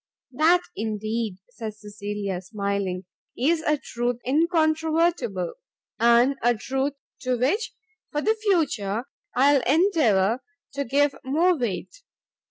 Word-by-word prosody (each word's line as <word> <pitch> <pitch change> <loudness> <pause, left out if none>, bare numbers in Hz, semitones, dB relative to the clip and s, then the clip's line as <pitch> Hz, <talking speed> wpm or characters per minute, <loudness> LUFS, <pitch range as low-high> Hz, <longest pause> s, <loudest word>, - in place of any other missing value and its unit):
"That, 320 +7 +4
indeed," 215 -1 -2
said 220 -3 -6
Cecilia, 205 -3 -5
smiling, 200 -2 -3 0.3
"is 315 +6 +2
a 305 -1 +1
truth 240 -2 -2
incontrovertible! 315 - +1 0.5
and 235 +4 +5
a 240 +1 +3
truth 265 +5 -2 0.3
to 255 -1 -1
which, 385 - 0 0.4
for 295 0 -1
the 440 - +3
future, 300 - 0 0.3
I 280 +3 +5
will 275 -3 +3
endeavour 255 - +3 0.3
to 280 0 -2
give 285 +3 +2
more 325 +7 +3
weight. 250 - -4
255 Hz, 115 wpm, -25 LUFS, 215-315 Hz, 0.5 s, and